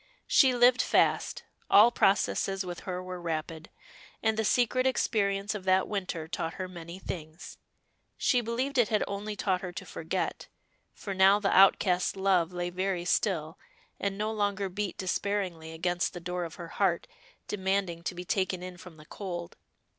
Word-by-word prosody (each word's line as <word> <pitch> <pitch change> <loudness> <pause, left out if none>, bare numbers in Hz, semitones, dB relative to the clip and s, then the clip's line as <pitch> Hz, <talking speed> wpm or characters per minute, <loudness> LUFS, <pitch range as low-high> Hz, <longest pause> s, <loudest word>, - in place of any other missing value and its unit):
She 260 -3 +5
lived 245 0 +5
fast; - - +1 0.3
all 220 +4 +7
processes 195 -2 +1
with 175 -1 -6
her 180 0 -3
were 185 -1 -7
rapid; 160 -1 -4 0.5
and 220 0 +2
the 220 - 0
secret 250 +3 +2
experience 200 -5 0
of 205 -3 -6
that 190 0 +3
winter 185 -6 -3
taught 165 0 -4
her 185 -1 -4
many 170 -1 -9
things. 165 -3 -8 0.6
She 250 -2 +2
believed 250 +4 -1
it 235 - +5
had 215 -1 +1
only 205 +1 -4
taught 190 -2 0
her 180 - -5
to - - -7
forget, - - -3 0.4
for 200 - -6
now 190 +2 +5
the 200 -1 +1
outcast 185 -1 +4
love 185 -3 +2
lay 175 0 -3
very 185 -1 -2
still, 165 -4 0 0.4
and 200 -1 -2
no 215 +1 -1
longer 205 -2 -1
beat 200 +1 -4
despairingly 185 -4 -2
against 175 +2 -1
the 175 - -6
door 180 0 -3
of 165 - -8
her 170 -1 -8
heart, 180 -3 0 0.4
demanding 190 -3 -1
to 180 - -3
be 180 +1 -6
taken 185 -1 -1
in 180 -1 -8
from 175 -2 -13
the 155 - -14
cold. 175 -1 -6
190 Hz, 170 wpm, -29 LUFS, 175-205 Hz, 0.6 s, all